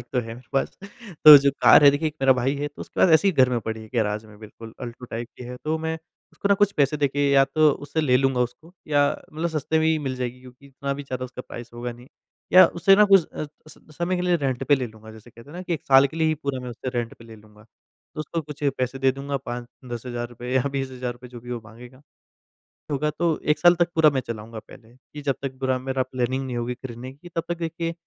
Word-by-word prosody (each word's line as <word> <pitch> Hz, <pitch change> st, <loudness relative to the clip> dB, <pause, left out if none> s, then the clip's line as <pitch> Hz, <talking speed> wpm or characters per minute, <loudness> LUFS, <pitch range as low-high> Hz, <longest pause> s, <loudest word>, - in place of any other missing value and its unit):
Bike -, -, -11 dB
तो 125 Hz, -, +1 dB
है 115 Hz, -, -9 dB
मेरे 120 Hz, 0 st, -15 dB
पास। 135 Hz, -, -1 dB, 0.5 s
तो 150 Hz, -1 st, +13 dB
जो 140 Hz, 0 st, +2 dB
कार -, -, +8 dB
है, 140 Hz, -, +10 dB
देखिए 145 Hz, +3 st, 0 dB
1 150 Hz, -, -11 dB
मेरा 135 Hz, 0 st, +6 dB
भाई 130 Hz, +2 st, 0 dB
है, 145 Hz, +1 st, -3 dB
तो 145 Hz, -, -16 dB
उसके -, -, -6 dB
पास 185 Hz, -, +6 dB
ऐसे 195 Hz, +5 st, +4 dB
ही -, -, +2 dB
घर 130 Hz, -5 st, +4 dB
में 125 Hz, -, +1 dB
पड़ी 110 Hz, +1 st, -5 dB
है, 110 Hz, -, -12 dB
गैराज 110 Hz, -1 st, 0 dB
में, 105 Hz, -1 st, -16 dB
बिल्कुल, 110 Hz, +1 st, -12 dB
अल्टो 120 Hz, 0 st, -8 dB
टाइप 120 Hz, 0 st, -6 dB
की 125 Hz, -, -9 dB
है। 125 Hz, +1 st, -7 dB
तो 155 Hz, +1 st, 0 dB
मैं 160 Hz, 0 st, -3 dB, 0.3 s
उसको 200 Hz, -, -3 dB
ना 200 Hz, -, +5 dB
कुछ 205 Hz, -, +4 dB
पैसे 145 Hz, -3 st, +1 dB
देके 145 Hz, 0 st, +1 dB
या 135 Hz, -1 st, +6 dB
तो 150 Hz, +2 st, +3 dB
उससे 145 Hz, +2 st, -3 dB
ले 130 Hz, -5 st, +3 dB
लूँगा 135 Hz, -1 st, +1 dB
उसको, 125 Hz, +8 st, -4 dB, 0.2 s
या 145 Hz, -1 st, +3 dB, 0.2 s
मतलब 160 Hz, +3 st, -2 dB
सस्ते 160 Hz, 0 st, -1 dB
में 160 Hz, -, +2 dB
ही 160 Hz, 0 st, +2 dB
मिल 135 Hz, -3 st, -4 dB
जाएगी 125 Hz, 0 st, -4 dB
क्योंकि 125 Hz, +2 st, -16 dB
इतना 140 Hz, 0 st, -4 dB
भी 145 Hz, -, -6 dB
ज़्यादा 130 Hz, -2 st, -5 dB
उसका 125 Hz, 0 st, -8 dB
प्राइस 120 Hz, -1 st, -10 dB
होगा 120 Hz, 0 st, -5 dB
नहीं। 120 Hz, +2 st, -16 dB, 0.4 s
या 185 Hz, 0 st, +10 dB
उसे 195 Hz, +3 st, +6 dB
ना 210 Hz, -, +7 dB
कुछ 195 Hz, -4 st, +5 dB
अ, 155 Hz, -, -5 dB, 0.2 s
स 155 Hz, -, -15 dB, 0.2 s
समय 175 Hz, +2 st, 0 dB
के 180 Hz, -, -2 dB
लिए 180 Hz, -1 st, +2 dB
रेंट 135 Hz, -5 st, -2 dB
पे 145 Hz, -, +5 dB
ले 130 Hz, -2 st, -2 dB
लूँगा, 110 Hz, -1 st, -14 dB
जैसे 110 Hz, +2 st, -15 dB
कहते 115 Hz, +5 st, -15 dB
हैं 165 Hz, -, -10 dB
ना 180 Hz, -, -6 dB
कि 180 Hz, -, -4 dB
1 -, -, -7 dB
साल 135 Hz, 0 st, +6 dB
के 140 Hz, -, -11 dB
लिए 160 Hz, -1 st, +2 dB
ही 155 Hz, -, +1 dB
पूरा 140 Hz, -4 st, -4 dB
मैं 125 Hz, -, -6 dB
उसे 120 Hz, +2 st, -6 dB
रेंट 120 Hz, -1 st, -4 dB
पे 115 Hz, -, -16 dB
ले 115 Hz, -1 st, -12 dB
लूँगा। 105 Hz, 0 st, -19 dB, 0.5 s
तो -, -, -5 dB
उसको 160 Hz, +2 st, -3 dB
कुछ 150 Hz, 0 st, -11 dB, 0.2 s
पैसे 130 Hz, +1 st, -2 dB
दे 135 Hz, 0 st, +3 dB
दूँगा, 140 Hz, +1 st, -4 dB
5-10 120 Hz, -1 st, -8 dB
हज़ार 120 Hz, -1 st, -4 dB
रुपए 120 Hz, +1 st, -7 dB
या 130 Hz, -, +3 dB
₹20,000 125 Hz, -2 st, -5 dB
जो 120 Hz, -1 st, -11 dB
भी 120 Hz, +1 st, -10 dB
वो 120 Hz, -, -4 dB
माँगेगा। 120 Hz, +4 st, -14 dB, 0.9 s
होगा 150 Hz, +2 st, 0 dB
तो 170 Hz, -2 st, +1 dB
1 150 Hz, -, +3 dB
साल 175 Hz, 0 st, +6 dB
तक 175 Hz, 0 st, +3 dB
पूरा 160 Hz, -1 st, +6 dB
मैं 135 Hz, -3 st, -1 dB
चलाऊँगा 110 Hz, 0 st, -6 dB
पहले 110 Hz, +1 st, -17 dB
कि 145 Hz, +3 st, -12 dB
जब 140 Hz, -2 st, 0 dB
तक 135 Hz, -1 st, -5 dB
पूरा 130 Hz, -1 st, 0 dB
मेरा 130 Hz, 0 st, -1 dB
प्लानिंग 130 Hz, +1 st, -2 dB
नहीं 125 Hz, -2 st, -4 dB
होगी 120 Hz, +1 st, -2 dB
खरीदने 125 Hz, 0 st, -8 dB
की, 155 Hz, +6 st, -14 dB
तब 165 Hz, -, 0 dB
तक 175 Hz, -, -2 dB
देखिए 165 Hz, 0 st, -3 dB
135 Hz, 265 wpm, -24 LUFS, 120-150 Hz, 0.9 s, तो